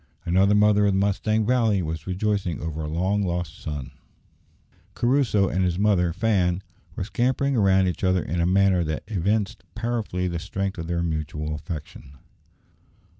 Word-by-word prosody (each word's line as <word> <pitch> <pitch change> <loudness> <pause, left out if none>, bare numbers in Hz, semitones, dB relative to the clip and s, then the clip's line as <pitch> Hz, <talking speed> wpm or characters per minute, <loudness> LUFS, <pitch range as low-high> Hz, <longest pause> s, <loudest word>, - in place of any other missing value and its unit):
Another 95 +4 +3
mother 105 0 +4
of 100 - +2
the 95 - +2
Mustang 105 +2 +1
Valley 115 -5 +2
was 80 0 -5
rejoicing 95 -2 -1
over 80 0 -4
a 75 - -3
long 95 +6 0
lost 90 -2 -3
son. 75 -4 -5 1.0
Crusoe 120 -6 +2
and 95 +1 0
his 90 -1 0
mother 95 -4 +2
Fan 95 -2 +1 0.3
were 100 - -3
scampering 130 +6 0
round 95 -3 +4
each 90 - -3
other 95 -2 +2
in 85 +3 -2
a 85 - +2
manner 95 -1 +3
that 80 -1 -3
evinced 100 +1 -1
powerfully 110 -5 -2
the 85 -1 -3
strength 95 +2 -3
of 80 - -5
their 85 0 -1
mutual 75 -1 -3
affection. 75 -2 -8
95 Hz, 160 wpm, -24 LUFS, 85-105 Hz, 1.0 s, mother